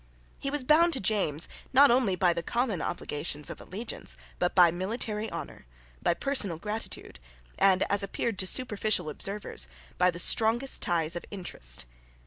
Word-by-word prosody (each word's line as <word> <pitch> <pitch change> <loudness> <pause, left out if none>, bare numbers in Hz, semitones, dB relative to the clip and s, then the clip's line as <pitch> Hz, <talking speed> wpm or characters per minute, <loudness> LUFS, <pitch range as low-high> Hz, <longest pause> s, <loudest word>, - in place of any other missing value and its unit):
He 275 - -3
was 290 -1 -2
bound 330 +5 +4
to 265 - 0
James, 185 -7 +1 0.3
not 275 +1 +7
only 240 -6 +2
by 180 -1 +2
the 170 - -3
common 230 -3 -1
obligations 150 -3 -4
of - - -9
allegiance, 215 +6 -4 0.2
but 180 - 0
by 175 -3 +7
military 210 +4 -3
honour, - - -8 0.3
by 170 - +1
personal 210 - +1
gratitude, 210 - -5 0.4
and, 190 -1 +4
as 200 0 +1
appeared 195 +1 -2
to 185 - +2
superficial 210 -7 0
observers, 195 - -3 0.3
by 180 0 +5
the 170 - -4
strongest 230 +8 +4
ties 165 -1 0
of 175 - -5
interest. 60 - -1
195 Hz, 155 wpm, -28 LUFS, 175-230 Hz, 0.4 s, not